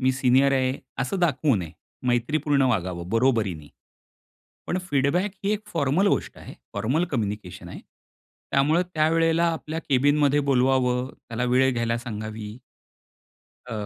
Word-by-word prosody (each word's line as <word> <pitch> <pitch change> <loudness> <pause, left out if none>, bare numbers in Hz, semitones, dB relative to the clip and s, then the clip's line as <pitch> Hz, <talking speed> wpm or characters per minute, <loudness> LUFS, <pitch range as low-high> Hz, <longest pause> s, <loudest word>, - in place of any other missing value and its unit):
मी 130 0 +2
senior 130 +1 +3
आहे, 130 -1 +2 0.3
असं 135 +8 -1
दाखवू 145 -5 +2
नये. 85 -4 -4 0.4
मैत्रीपूर्ण 140 +4 +1
वागावं 90 -5 -2
बरोबरीने. 110 - +1 1.0
पण 180 - 0
फीडबॅक 145 +8 +1
ही 200 - +1
एक 210 - -2
फॉर्मल 165 +5 +2
गोष्ट - - -1
आहे, - - -11 0.2
फॉर्मल 150 +10 0
कम्युनिकेशन 105 - -4
आहे. - - -8 0.7
त्यामुळे 150 +5 +3
त्यावेळेला 165 +1 +2
आपल्या 160 0 -5
कॅबिनमध्ये 145 +2 +3
बोलवावं, 125 -1 +2 0.2
त्याला 115 +1 -2
वेळ 130 +2 +3
घ्यायला 115 -1 0
सांगावी. 110 -2 -6 1.1
अ, - - -6
130 Hz, 125 wpm, -25 LUFS, 115-150 Hz, 1.1 s, senior